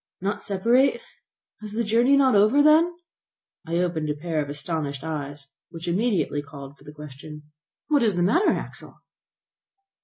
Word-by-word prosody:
"Not 200 +2 -3
separate! 240 - +2 0.6
Is 210 -1 -8
the 235 +2 -1
journey 235 +6 +3
not 265 -2 +4
over, 215 +8 +4
then?" 315 +3 +5 0.8
I 165 - -2
opened 170 -3 -1
a 150 - -1
pair 155 0 -2
of 145 - -5
astonished 145 -1 -4
eyes, 145 -3 -6 0.2
which 165 +1 -9
immediately 185 -5 0
called 140 -1 -11
for 140 - -22
the 145 - -11
question: 150 0 -11 0.4
"What 295 -3 +2
is 215 -5 +2
the 175 - +1
matter, 290 - +3
Axel?" - - -6
175 Hz, 155 wpm, -24 LUFS, 150-230 Hz, 0.8 s, then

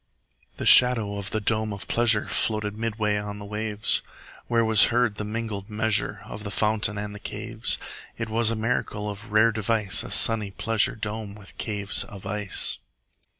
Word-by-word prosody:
30 - - -33
The - - -4
shadow 115 -5 +6
of 100 -1 -5
the 110 - -1
dome 110 0 0
of 100 -1 -7
pleasure 115 -3 +3
Floated 105 -2 -1
midway 110 -2 -1
on 105 0 -5
the 105 - -9
waves; 105 0 0 0.5
Where 115 -1 +2
was 110 -1 +7
heard 120 -2 +1
the - - -3
mingled 105 -2 -5
measure 110 0 0
From 100 - -7
the 105 - -6
fountain 105 0 0
and 105 0 -5
the 105 - -9
caves. 110 +2 -2 0.4
It 115 - -3
was 110 0 +3
a 115 - -1
miracle 110 -2 -2
of 105 +2 -7
rare 110 +2 +5
device, 105 -5 0
35 - - -7
A - - -11
sunny 110 -3 +3
pleasure 110 +2 +1
dome 105 -1 -5
with 105 -2 -14
caves 100 -2 0
of 100 -2 -12
ice! 105 -1 -1
105 Hz, 185 wpm, -25 LUFS, 105-110 Hz, 0.5 s, was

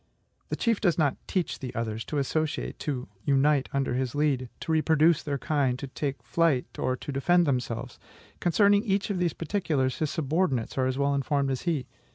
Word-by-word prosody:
The - - -1
chief 230 -3 +1
does 175 -5 +2
not 145 -5 +2
teach 185 -3 -1
the 130 -2 -6
others 110 -1 -2
to 150 - -3
associate, 155 +2 -1
to 130 -4 -3 0.2
unite 140 0 +3
under 135 -2 0
his 130 0 -1
lead, 140 -4 +1
to - - -3
reproduce 160 0 +4
their 145 -2 -2
kind, 140 -4 0
to 135 - -5
take 140 +1 -3
to - - -34
flight, 165 -7 +1
or 130 - 0
to 145 - -7
defend 175 +6 +3
themselves. 125 -3 -2 0.4
Concerning 200 +4 +4
each 200 -2 0
of 190 - -1
these 175 -3 +1
particulars, 160 -7 -1
his 155 - 0
subordinates 150 -5 0
are 130 -1 +1
as 130 0 -1
well 140 0 +2
informed 140 0 0
as 130 - -2
he. 145 -7 -1
145 Hz, 195 wpm, -27 LUFS, 130-165 Hz, 0.4 s, reproduce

